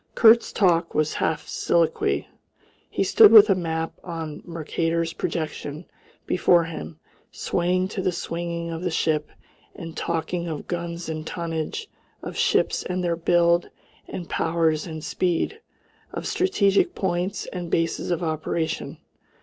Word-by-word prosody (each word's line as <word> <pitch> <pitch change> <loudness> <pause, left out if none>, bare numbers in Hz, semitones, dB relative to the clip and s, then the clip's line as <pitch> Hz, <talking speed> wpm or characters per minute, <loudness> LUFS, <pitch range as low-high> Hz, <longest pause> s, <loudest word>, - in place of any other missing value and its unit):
Kurt's 230 +1 +6
talk 170 -4 +2
was 155 0 +1
half 160 -1 -1
soliloquy. 160 - +1 0.6
He - - 0
stood 210 +2 +7
with 215 -2 +9
a - - +7
map 165 -3 -2
on 165 -3 -6
Mercator's 165 0 -2
projection 155 0 -4 0.4
before 175 -1 +4
him, 165 -1 -7 0.3
swaying 185 +1 0
to 195 - -3
the 185 -1 +1
swinging 170 -1 -4
of 165 0 -5
the 180 - -1
ship 155 -2 0 0.5
and 165 -1 -8
talking 170 +1 -2
of 155 -3 -5
guns 170 0 -4
and 155 -1 -4
tonnage, 170 - -4 0.4
of - - -6
ships - - +2
and 180 0 -3
their 170 -1 +1
build 170 +1 +3 0.4
and 175 -2 -6
powers 160 -1 0
and 160 -2 -7
speed, 185 - -1 0.5
of - - -5
strategic 230 - +2
points, 180 0 -1
and 175 -2 -5
bases 165 +1 0
of 175 -1 -1
operation. 160 0 -2
170 Hz, 135 wpm, -24 LUFS, 160-180 Hz, 0.6 s, with